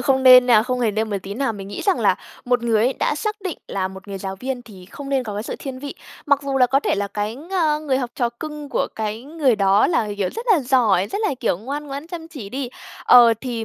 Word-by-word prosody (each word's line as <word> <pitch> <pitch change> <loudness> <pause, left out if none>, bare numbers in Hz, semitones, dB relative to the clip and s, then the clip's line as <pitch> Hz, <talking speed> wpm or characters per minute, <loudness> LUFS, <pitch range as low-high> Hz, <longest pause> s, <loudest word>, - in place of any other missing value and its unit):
không 265 +1 +2
nên 255 -1 +8
nha, 230 -4 +6
không 250 +1 -2
hề 230 -3 +2
nên 215 +1 -2
một 200 - -1
tí 200 +1 -6
nào. 250 0 -1
Mình 195 -2 -8
nghĩ - - -6
rằng 390 -3 +1
là - - +4 0.3
một 245 -1 +1
người 225 -2 +2
ấy, 255 - +2
đã - - +1
xác 425 +8 -3
định 355 - -4
là 190 -1 -2
một 190 +1 -12
người 195 -1 -5
giáo 190 0 -5
viên 255 +3 -4
thì 200 -6 -13
không 275 +8 -9
nên 270 -2 +1
có 210 -3 -5
cái 205 - -3
sự - - -5
thiên 265 -2 -6
vị. 285 +1 -7 0.3
Mặc 285 -1 +3
dù 275 -1 -2
là 250 - +5
có 270 +2 +2
thể - - 0
là 200 0 -2
cái 210 +2 -3
ng 310 -1 -1
người 265 -2 +2
học 245 -3 -3
trò 240 -2 0
cưng 300 -2 -6
của - - 0
cái 220 +1 -3
người 285 -4 +1
đó 200 0 +4
là, 280 -11 0
kiểu, 200 -2 0
rất 460 +2 -6
là 345 - +3
giỏi, 235 -8 +2
rất 220 - -4
là, 420 -9 0
kiểu, 205 -7 0
ngoan 280 +7 -5
ngoãn, 280 +2 -6
chăm 335 -2 -8
chỉ 275 -12 -8
đi, 260 +3 -4 0.4
ờ, 240 -2 +7
thì 240 -4 -4
250 Hz, 275 wpm, -21 LUFS, 215-285 Hz, 0.4 s, nên